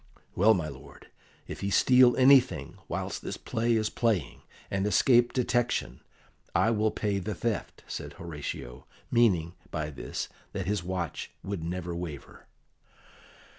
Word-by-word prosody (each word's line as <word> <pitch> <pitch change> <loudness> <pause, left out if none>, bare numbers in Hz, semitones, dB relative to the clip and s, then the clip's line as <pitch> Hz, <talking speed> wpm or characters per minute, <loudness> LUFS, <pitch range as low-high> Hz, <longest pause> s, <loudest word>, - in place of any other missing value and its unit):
"Well, 110 +4 +5
my 85 -4 -2
lord, 70 -1 -12 0.4
if - - -6
he 100 - -2
steal 125 +4 +5
anything 130 0 +4
whilst - - -3
this - - -5
play 115 +1 0
is 110 -1 0
playing, 110 -10 0 0.3
and 95 +1 0
escape 120 +4 +4
detection, 120 -1 0 0.6
I 115 - +4
will 110 -1 +2
pay 105 -2 -1
the 105 +3 -4
theft," 115 -5 -3
said - - -6
Horatio, 75 -7 -7 0.2
meaning 90 -9 +3 0.2
by 75 -2 -3
this 70 - -5 0.3
that 95 -2 -3
his 105 +1 0
watch 90 -1 -3
would 95 -4 -4
never 85 0 -4
waver. 80 -5 -8
100 Hz, 135 wpm, -29 LUFS, 85-115 Hz, 0.6 s, Well